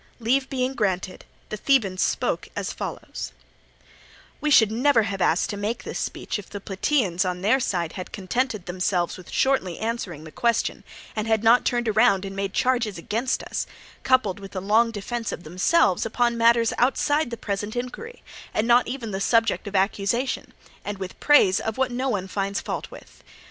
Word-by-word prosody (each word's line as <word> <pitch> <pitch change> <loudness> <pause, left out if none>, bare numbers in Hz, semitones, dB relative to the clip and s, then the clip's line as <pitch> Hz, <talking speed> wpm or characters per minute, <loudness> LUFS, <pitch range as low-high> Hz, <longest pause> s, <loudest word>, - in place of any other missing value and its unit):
Leave 260 +4 +1
being 260 0 -1
granted, 190 -5 -2 0.2
the 215 - -4
Thebans 205 -7 +2
spoke - - 0
as - - -3
follows: - - -6 1.1
"We 300 - 0
should 220 -7 +6
never 240 0 +3
have 200 -2 -3
asked 175 +4 +2
to 205 - -5
make 210 +4 -3
this - - -5
speech - - -3
if 200 - -11
the 205 - -6
Plataeans 195 - 0
on 180 -1 -3
their 225 +7 +4
side 175 -9 -1
had 185 - -7
contented 215 +1 -2
themselves 180 -1 -1
with 185 - -12
shortly 265 -10 +1
answering 220 -9 -4
the 155 - -10
question, 235 0 0 0.3
and 215 0 -2
had 220 -1 +2
not 230 +2 +5
turned 240 -3 0
round 200 -4 +4
and 195 0 -6
made 195 0 -2
charges 240 -5 +1
against 230 +9 -1
us, - - -3 0.3
coupled 255 -8 +2
with 195 0 -11
a - - -1
long 215 +5 +3
defence 230 +2 -4
of 175 - -6
themselves 180 - +2
upon 235 +1 +1
matters 230 0 +4
outside 290 +3 +2
the 235 - -5
present 205 +1 -4
inquiry 250 - -6 0.3
and 215 - +2
not 240 +1 +5
even 245 -4 -4
the 190 0 -3
subject 225 0 +2
of 200 - -5
accusation, 200 +6 0 0.3
and 205 -1 -4
with 190 -1 -7
praise 200 -11 +5
of 220 +1 -3
what 260 -1 +1
no 255 +2 -1
one 195 -5 -1
finds 195 +1 -2
fault - - -5
with. - - -14
220 Hz, 180 wpm, -24 LUFS, 195-245 Hz, 1.1 s, should